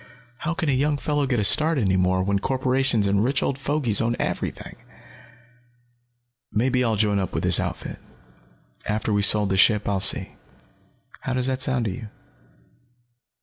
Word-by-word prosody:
How 170 +5 -4
can 165 - -3
a - - +2
young 145 +3 0
fellow 145 -1 -1
get 125 -3 0
a - - 0
start 155 +9 +5
any 95 -7 +1
more, 95 0 +1
when 100 +1 0
corporations 130 -2 0
and 100 +1 +1
rich 135 +4 0
old 135 - -2
fogies 140 -6 0
own 115 +1 -1
everything? - - -5 1.7
"Maybe 125 +3 0
I'll 115 -2 0
join 105 -1 +1
up 95 - -4
with - - -3
this - - +4
outfit. - - -5 0.9
After 105 0 -2
we've 100 0 +1
sold 105 0 +4
the 95 - 0
ship 105 +1 +3
I'll 100 -1 0
see. - - +1 0.9
How 130 - -4
does 125 -1 -1
that 130 0 -2
sound 130 -3 0
to 105 - -2
you?" 115 +1 -8
120 Hz, 170 wpm, -23 LUFS, 100-135 Hz, 1.7 s, start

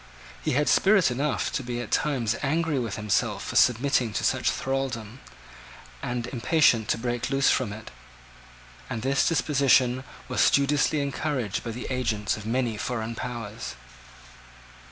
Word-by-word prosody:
He - - 0
had 150 +3 +1
spirit 195 -7 +4
enough 135 +3 -1
to - - -2
be 120 -1 -4
at 120 - -6
times 130 -7 +1
angry 155 0 0
with 115 -5 -3
himself 105 -2 0
for - - -6
submitting 125 -2 +3
to - - -2
such - - +2
thraldom, 130 -4 -3 0.8
and 120 -1 -3
impatient 120 -2 +2
to - - +1
break 120 +1 -2
loose 135 0 +3
from 125 -6 0
it; 110 +1 -9 1.0
and 115 -1 -4
this 135 +1 +2
disposition 135 -5 +3 0.2
was 130 - 0
studiously 145 +1 +3
encouraged 140 -6 -2
by 120 - -5
the 120 +2 -6
agents 110 -5 -1
of 110 0 -8
many 120 -2 0
foreign 115 0 -3
powers. 115 - -6
125 Hz, 145 wpm, -26 LUFS, 115-140 Hz, 1.0 s, spirit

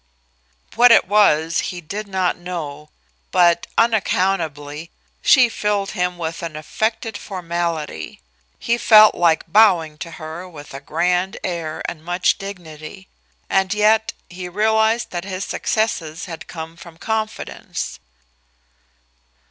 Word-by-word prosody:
What 245 +1 +6
it 230 - +6
was 165 -5 +3
he 180 - -6
did 205 +6 -6
not 190 -2 0
know, 155 -5 -7 0.4
but 170 -1 +3
unaccountably 170 -9 0 0.3
she 255 -4 +6
filled 210 -3 -1
him 180 -2 -1
with 165 -1 -4
an 165 -2 -5
affected 220 +8 -2
formality 170 - -4 0.4
He 235 +1 0
felt 215 -2 +7
like 170 -2 +2
bowing 175 -8 +4
to 170 - -6
her 160 +4 -8
with 150 -5 -12
a 135 - -6
grand 180 +5 0
air 165 -3 -4
and 155 -2 -6
much 175 +3 +1
dignity. 185 -2 -9 0.4
And 190 +1 +1
yet 220 +1 +3
he 180 0 -7
realized 220 +4 +1
that 175 -1 -4
his 190 0 -4
successes 175 -8 -2
had 165 -3 -8
come 165 0 -8
from 170 -1 -13
confidence. 220 +2 -4
180 Hz, 125 wpm, -20 LUFS, 160-210 Hz, 0.4 s, felt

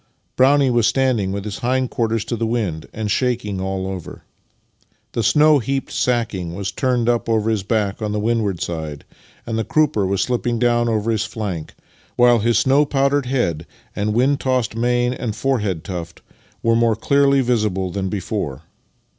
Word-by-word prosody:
Brownie 135 0 +4
was 120 -2 +3
standing 125 -8 +1
with 100 +1 -4
his 105 -1 -5
hindquarters 120 -3 0
to 120 - -2
the 115 0 -1
wind, 100 -9 -2
and 105 -1 -3
shaking 115 -6 -1
all 95 0 -2
over. 95 -3 -7 0.9
The 115 - -1
snow 150 +6 +5
heaped 135 +3 -3
sacking 105 -9 -1
was 100 +1 -3
turned 125 +2 0
up 120 -1 +1
over 110 0 +1
his 110 -3 0
back 105 +1 -1
on 105 -1 -2
the 105 - -1
windward 105 -4 0
side, 80 -4 -5 0.4
and 115 -1 -2
the - - 0
crupper 150 -11 +1
was 95 0 0
slipping 120 -1 -1
down 120 0 +2
over 110 0 0
his 110 -1 0
flank, 100 -8 -5 0.4
while 120 -1 +5
his 115 +2 +2
snow 135 +3 +4
powdered 140 -1 +1
head 85 - -1 0.3
and 105 +1 -1
wind 135 +4 +2
tossed 130 -5 0
mane 120 +1 +1
and 115 -4 -4
forehead 105 -10 -1
tuft 85 -2 -7 0.4
were 115 0 +3
more 115 -1 +3
clearly 140 +4 +3
visible 105 -7 0
than 95 0 -2
before. 90 -7 -4
115 Hz, 170 wpm, -20 LUFS, 100-125 Hz, 0.9 s, snow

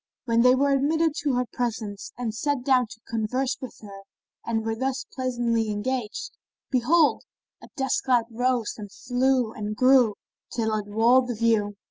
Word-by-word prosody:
When 230 -1 +2
they 250 +1 +6
were 280 +2 +2
admitted 310 +3 +2
to 290 -5 0
her 250 0 +1
presence 220 -4 -4
and 240 -3 -3
sat 280 +3 -1
down 255 -2 +3
to 220 - -13
converse 250 +4 -1
with 260 - -8
her 200 -2 -10 0.4
and 225 -1 -2
were 225 - 0
thus 260 +2 -2
pleasantly 240 -3 -1
engaged, 215 +1 -3 0.4
behold, 290 +5 +3 0.4
a - - -12
dust 265 -1 0
cloud 245 -3 +3
rose 245 -1 0
and 205 -2 -8
flew 250 -1 0
and 210 0 -4
grew, 255 -3 +5 0.4
till 220 -2 -1
it 210 -1 -2
walled 235 +5 +4
the 240 - -3
view. 215 -2 +1
245 Hz, 165 wpm, -25 LUFS, 220-260 Hz, 0.4 s, they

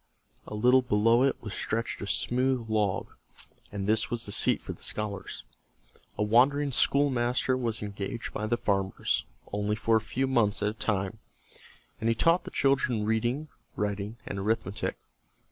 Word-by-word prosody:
A - - -6
little 125 +4 +5
below 115 0 +3
it 135 +1 +2
was 105 -2 -5
stretched 115 +1 -3
a 100 - -4
smooth 125 +1 +1
log, 105 -3 0 0.6
and 100 -1 -4
this 110 +2 +2
was 120 -1 -3
the 100 - -5
seat - - +3
for - - -7
the - - -18
scholars. 105 -3 -4 0.7
A - - +1
wandering 135 +6 +3
schoolmaster 130 -2 +2
was 115 -4 -2
engaged 100 +3 -5
by 105 - -2
the 120 +2 +1
farmers, 100 -4 0 0.3
only 105 +1 0
for 115 +1 +2
a - - -1
few 120 +5 -1
months 115 -6 +1
at 105 - +2
a - - -4
time, 105 -1 -2 0.8
and 115 - 0
he 115 - +2
taught 165 +9 +3
the - - -5
children 130 -5 +1
reading, 120 +7 0 0.3
writing, 105 +2 -3
and 100 - -4
arithmetic. 105 0 -1
110 Hz, 160 wpm, -28 LUFS, 105-125 Hz, 0.8 s, little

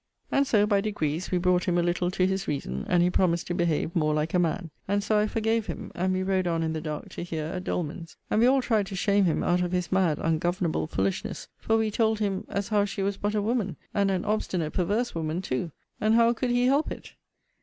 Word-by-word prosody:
And 275 0 +2
so, 210 -4 +4
by 205 -2 +2
degrees, 180 -5 -2
we 180 - +1
brought 180 0 +2
him 175 -1 +1
a 175 - +2
little 175 +1 0
to 185 0 +1
his 190 +1 -1
reason, 65 - -3
and 175 -1 +4
he 180 - +2
promised 170 -2 +1
to 175 - -3
behave 170 -2 0
more 155 -2 +2
like 155 +1 -1
a 180 - +3
man. 170 0 -1 0.2
And 200 +1 +1
so 215 0 +2
I 210 - +2
forgave 225 0 0
him: - - -6
and 185 +2 0
we 185 0 0
rode 185 -1 +1
on 165 -1 0
in 160 0 -1
the 160 - -3
dark 155 -2 -5
to - - -7
here 165 -3 -4
at 180 +3 -5
Doleman's. 165 0 -4
And 215 - +3
we 240 - +6
all 265 0 +4
tried 215 -5 +1
to 195 - -6
shame 200 +1 +2
him 165 - +1
out 175 0 +2
of 180 0 -1
his 180 -1 -1
mad, 185 -6 +2
ungovernable 165 - 0
foolishness: 95 0 -2
for 225 - +1
we 220 -1 0
told 220 0 +2
him, 200 -3 -2
as 200 +1 -2
how 210 -2 +3
she 200 -1 -3
was 200 0 -1
but 205 +1 -1
a 210 - +1
woman, 215 -6 -1 0.2
and 200 -1 +2
an 185 -2 -1
obstinate 185 -7 -1
perverse 210 +7 0
woman 160 0 -2
too; 170 -1 -2 0.3
and 215 +1 +3
how 230 0 +5
could 245 +2 -2
he 245 0 +2
help 280 +4 +2
it? - - -8
185 Hz, 250 wpm, -27 LUFS, 170-210 Hz, 0.3 s, we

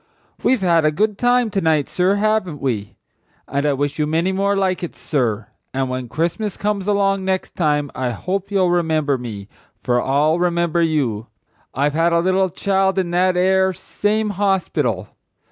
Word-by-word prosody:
"We've 255 -5 +2
had 170 -3 +3
a 155 - +3
good 205 +5 0
time 245 -2 +2
to 195 - 0
night, 155 -4 +2
sir, 185 +2 +1
haven't 205 -7 0
we? 110 -7 -3 0.5
And 140 +2 -1
I 145 - +2
wish 145 +2 -2
you 150 - +1
many 165 +4 +1
more 200 +1 +1
like 190 -2 0
it, 175 - -5
sir. 115 -8 -2 0.3
And 135 -1 -1
when 130 -1 -4
Christmas 175 - -2
comes 205 -2 -2
along 195 -1 +1
next 190 0 -2
time 150 -4 0
I 130 -1 -2
hope 185 - -3
you'll 190 -3 +2
remember 155 -5 +1
me, 105 -5 -7 0.4
for 120 -1 +1
I'll 150 +5 +2
remember 170 -1 +1
you; 130 -9 0 0.5
I've 145 +1 +1
had 165 +2 +2
a 170 - +4
little 185 +2 +2
child 190 +2 0
in 180 -2 0
that 180 +1 +2
'ere 190 +1 +3
same 210 +4 -1
horspital. 180 - 0
175 Hz, 175 wpm, -20 LUFS, 145-195 Hz, 0.5 s, a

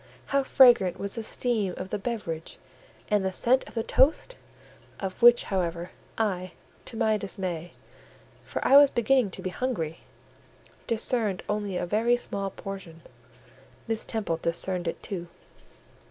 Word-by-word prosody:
How 275 - +4
fragrant 245 -9 +5
was 200 0 -4
the 230 - -3
steam 220 -4 -1
of 185 - -6
the - - -2
beverage, 195 -8 -5 0.5
and 205 -2 +3
the 190 - 0
scent 250 +7 +2
of - - -13
the 225 - -1
toast! 315 - +2 0.6
of 190 +2 -5
which, 240 0 +7
however, 175 -2 -2 0.3
I, 185 -4 -1 0.3
to 230 - -8
my 220 -2 +2
dismay 180 -4 -4 0.7
(for - - -3
I 275 - +8
was 285 -1 +8
beginning 240 -1 +2
to - - -8
be 185 - -3
hungry) 175 -10 -3 0.9
discerned 220 -3 0
only 205 -3 -2
a - - -2
very 225 +6 +2
small 200 -5 -3
portion: 190 -4 -9 0.9
Miss 225 -1 -1
Temple 210 -7 -2
discerned 175 +2 -1
it 165 - -4
too. 175 -3 -5
200 Hz, 145 wpm, -27 LUFS, 180-235 Hz, 0.9 s, I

